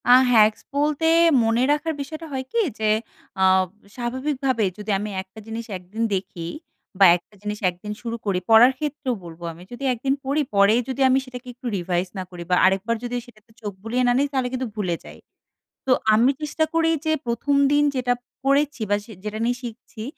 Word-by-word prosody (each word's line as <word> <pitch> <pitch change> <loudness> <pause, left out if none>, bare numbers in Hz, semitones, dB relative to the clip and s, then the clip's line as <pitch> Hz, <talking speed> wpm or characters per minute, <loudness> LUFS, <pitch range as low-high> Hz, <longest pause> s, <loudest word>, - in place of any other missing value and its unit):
আ - - +8 0.2
hacks 215 -2 +5
বলতে 295 +2 +1 0.4
মনে 230 +2 +2
রাখার 305 +2 0
বিষয়টা 310 +4 -7
হয় 260 -1 -3
কি 470 - +1 0.2
যে 215 -1 +1 0.5
আ - - +5 0.5
স্বাভাবিকভাবেই 260 -2 -1
যদি 210 0 -4
আমি 210 +1 -4
১ 190 - -15
টা - - -10
জিনিস 225 +1 -5
১ 180 - -17
দিন 225 +1 -1
দেখি 180 -3 -5 0.5
বা 195 - +8
১ 175 - -5
টা 210 - -22
জিনিস 210 0 -4
১ 175 - -8
দিন 210 0 -4
শুরু 230 -1 -4
করি, 195 -3 +1
পড়ার 225 +3 +8
ক্ষেত্রেও 290 -4 -2
বলবো 170 0 -11
আমি 170 +2 -13
যদি 245 +3 -8
১ - - -6
দিন 270 - +3
পড়ি, 280 +3 +1
পরেই 200 +4 +5
যদি 265 +1 -3
আমি 260 - +4
সেটাকে 250 -1 -10
একটু 250 +1 -17
রিভাইজ 180 0 -1
না 185 - -2
করি 175 -1 -7
বা 180 - +4
আরেকবার 195 +5 +2
যদি 245 0 -3
সেটাতে 225 -2 -20
চোখ 205 -2 -4
বুলিয়ে 240 +3 0
না - - +4
নিই, 280 +2 +2
তাহলে 260 -3 0
কিন্তু 255 0 -2
ভুলে 185 -5 -1
যাই। - - -12 0.7
তো - - +3 0.2
আমি 235 +5 +5
চেষ্টা 305 +1 0
করি, 330 0 +3 0.2
যে 315 - +2
১ম 235 +4 0 0.2
দিন 290 0 +4
যেটা 250 -1 +1 0.3
পরেছি, 280 -1 +2
বা 205 - +4
সে 225 - -13
যেটা 215 0 -4
নিয়ে 245 +1 0
শিখছি 230 -1 -8
240 Hz, 205 wpm, -23 LUFS, 210-270 Hz, 0.7 s, আ